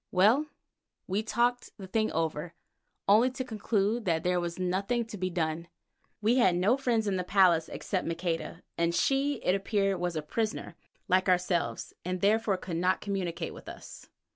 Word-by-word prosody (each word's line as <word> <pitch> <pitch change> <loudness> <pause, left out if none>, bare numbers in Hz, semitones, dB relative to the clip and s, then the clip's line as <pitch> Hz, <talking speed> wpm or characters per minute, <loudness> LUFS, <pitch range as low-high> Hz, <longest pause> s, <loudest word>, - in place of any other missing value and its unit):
Well, 220 +11 +4 0.6
we 195 +3 0
talked 240 +3 0
the 195 - -8
thing 215 +3 0
over, 165 +1 -2 0.5
only 220 +6 +6
to 260 0 -4
conclude 220 -1 -1
that 165 -3 +1
there 180 0 +2
was 170 -1 -3
nothing 195 +6 0
to 220 - -8
be 185 -2 -2
done. 170 -1 -2 0.6
We 230 +4 +4
had 190 -8 +4
no 190 +8 +3
friend 240 -5 0
in 195 -2 0
the 180 - -1
place 180 -3 +4
except 185 -4 -3
Maqueda, 165 0 -3 0.2
and 170 0 +1
she, 275 +5 +2
it 180 - +3
appeared, 195 -1 0
was 175 -1 -2
a 155 - -2
prisoner 215 +8 -3 0.3
like 185 +1 +3
ourselves, 180 -1 0
and 185 +1 -2
therefore 210 0 +2
could 175 -2 -5
not 180 +2 +2
communicate 195 -4 -3
with - - -10
us. - - -11
190 Hz, 170 wpm, -29 LUFS, 175-220 Hz, 0.6 s, only